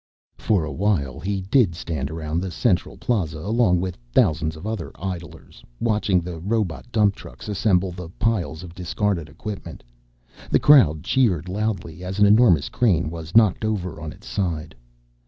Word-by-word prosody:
For 95 -7 +1
a 80 - -5
while 80 -6 0
he 100 0 -2
did 100 -2 +2
stand 75 -5 -4
around 80 +1 -3
the 95 - -3
Central 90 0 0
Plaza 90 -10 -1
along 100 0 +2
with 90 -2 -4
thousands 80 +4 +2
of 80 - -10
other 110 -6 -4
idlers, 90 -2 -7 0.2
watching 105 -5 +1
the 85 -1 -6
robot 105 +3 -2
dump 105 -3 +3
trucks 110 - -12
assemble 95 -3 +1
the 90 -1 -8
piles 90 -8 -1
of 85 -2 -10
discarded 90 -2 -2
equipment. 100 +7 -8 0.7
The - - +4
crowd 90 - +5
cheered 95 - +1
loudly 90 -4 -3
as 95 +2 -5
an 105 - +5
enormous 100 - +5
crane 85 -10 +1
was 85 +1 -8
knocked 110 -2 +4
over 95 -7 -2
on 80 -1 -5
its - - -15
side. 80 -5 -2
90 Hz, 160 wpm, -23 LUFS, 80-105 Hz, 0.7 s, crowd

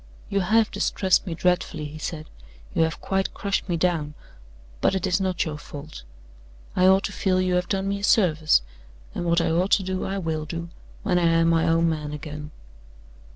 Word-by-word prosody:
"You 200 - +1
have 215 +3 +3
distressed 190 0 +1
me 170 - -3
dreadfully," 175 -3 0
he 150 +1 -8
said. 155 -1 -5 0.5
"You - - +1
have 160 0 0
quite 195 0 -1
crushed 200 -2 -2
me 170 - +1
down. 160 -4 0 0.7
But - - +2
it 190 - -1
is 190 +1 +1
not 185 -2 0
your 150 -2 -5
fault. 150 +1 -9 0.7
I 185 - +4
ought 190 +1 +5
to - - -2
feel 185 -2 +1
you 185 -1 +1
have 180 0 0
done 195 -1 -1
me 200 0 -1
a - - -10
service; 160 - +4 0.5
and - - -3
what 170 0 +3
I 165 - +1
ought 180 +4 +1
to 195 - +4
do 185 0 -2
I 195 - -2
will 160 -4 -2
do, 170 +2 -5 0.3
when 180 - +2
I 170 - +3
am 165 0 +3
my 165 0 +3
own 165 +1 +3
man 150 -2 -2
again. 150 0 -7
170 Hz, 200 wpm, -24 LUFS, 160-190 Hz, 0.7 s, ought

